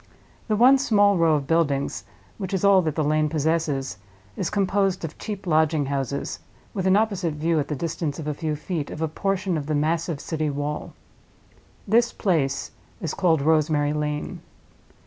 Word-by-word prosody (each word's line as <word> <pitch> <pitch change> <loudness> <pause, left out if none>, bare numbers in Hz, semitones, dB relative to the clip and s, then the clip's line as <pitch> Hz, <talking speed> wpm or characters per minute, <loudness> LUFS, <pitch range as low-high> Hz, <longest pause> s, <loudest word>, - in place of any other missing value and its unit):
The 215 - +1
one 255 +5 +6
small 205 -6 +4
row 165 -3 +4
of 145 -2 -1
buildings, 140 - 0 0.3
which 195 -1 -2
is 190 - 0
all 195 -1 +6
that 155 -4 -2
the 155 - +1
lane 155 +1 +2
possesses, 150 - -1 0.4
is 180 - -2
composed 195 -2 +1
of 160 - -7
cheap 205 -3 -6
lodging 155 -3 +2
houses, 140 0 -3 0.3
with 190 -2 -1
an 190 - +5
opposite 195 -7 0
view, 160 +1 +1
at 145 - -2
the 150 - -2
distance 160 -1 -3
of 160 - -6
a 150 - 0
few 155 +1 -2
feet, 155 -1 -4
of 160 - -4
a - - +1
portion 190 +1 -1
of 145 - -7
the 155 - 0
massive 160 +1 0
city 155 -1 -2
wall. 145 +1 -4 0.9
This 235 +3 +3
place 155 -9 0 0.3
is 165 - -3
called 165 -7 +2
Rosemary 150 -1 +2
Lane. 150 0 -3
160 Hz, 175 wpm, -24 LUFS, 150-190 Hz, 0.9 s, one